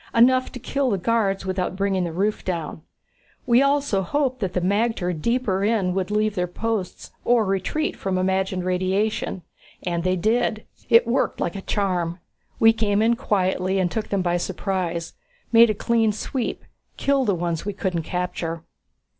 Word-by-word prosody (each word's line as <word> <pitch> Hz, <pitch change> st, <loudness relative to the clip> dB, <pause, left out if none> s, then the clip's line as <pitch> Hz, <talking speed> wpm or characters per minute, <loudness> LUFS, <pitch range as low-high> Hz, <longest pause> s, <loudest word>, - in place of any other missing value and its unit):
Enough 255 Hz, +2 st, +4 dB
to -, -, -6 dB
kill 275 Hz, +2 st, -1 dB
the 200 Hz, -, +1 dB
guards 195 Hz, -1 st, 0 dB
without 185 Hz, -1 st, -2 dB
bringing 195 Hz, -2 st, 0 dB
the 170 Hz, -, -3 dB
roof 200 Hz, +6 st, -1 dB
down. 165 Hz, -4 st, -4 dB, 0.6 s
We 240 Hz, +1 st, +5 dB
also 275 Hz, -7 st, +2 dB
hoped 260 Hz, +6 st, -1 dB
that 190 Hz, -5 st, -2 dB
the 180 Hz, -, +1 dB
magter 200 Hz, 0 st, 0 dB
deeper 200 Hz, +2 st, 0 dB
in 205 Hz, -4 st, +1 dB
would 190 Hz, 0 st, -1 dB
leave 215 Hz, 0 st, +1 dB
their 180 Hz, -3 st, -1 dB
posts 215 Hz, 0 st, -4 dB
or 235 Hz, -2 st, +3 dB
retreat 195 Hz, +11 st, -1 dB
from 190 Hz, -1 st, -2 dB
the 185 Hz, -, +1 dB
imagined 190 Hz, -1 st, 0 dB
radiation. 185 Hz, +1 st, -1 dB, 0.4 s
And 170 Hz, -2 st, -2 dB
they 185 Hz, 0 st, +1 dB
did. 220 Hz, +3 st, 0 dB, 0.2 s
It 230 Hz, 0 st, +6 dB
worked 235 Hz, +3 st, 0 dB
like 175 Hz, -, -2 dB
a 195 Hz, -, -5 dB
charm. 180 Hz, -5 st, -1 dB, 0.4 s
We 225 Hz, 0 st, +7 dB
came 215 Hz, -1 st, +1 dB
in 235 Hz, +1 st, +3 dB
quietly 190 Hz, -5 st, 0 dB
and 180 Hz, -2 st, +1 dB
took 220 Hz, -2 st, -3 dB
them 195 Hz, -2 st, 0 dB
by 175 Hz, 0 st, +1 dB
surprise. 175 Hz, -2 st, -3 dB, 0.4 s
Made 230 Hz, 0 st, +7 dB
a 215 Hz, -, 0 dB
clean 225 Hz, 0 st, +2 dB
sweep 235 Hz, +4 st, -3 dB, 0.3 s
killed 275 Hz, -3 st, +1 dB
the 200 Hz, -, +2 dB
ones 170 Hz, -2 st, -2 dB
we 205 Hz, -, -2 dB
couldn't 185 Hz, -4 st, -2 dB
capture." 170 Hz, -1 st, -3 dB
195 Hz, 170 wpm, -23 LUFS, 180-230 Hz, 0.6 s, We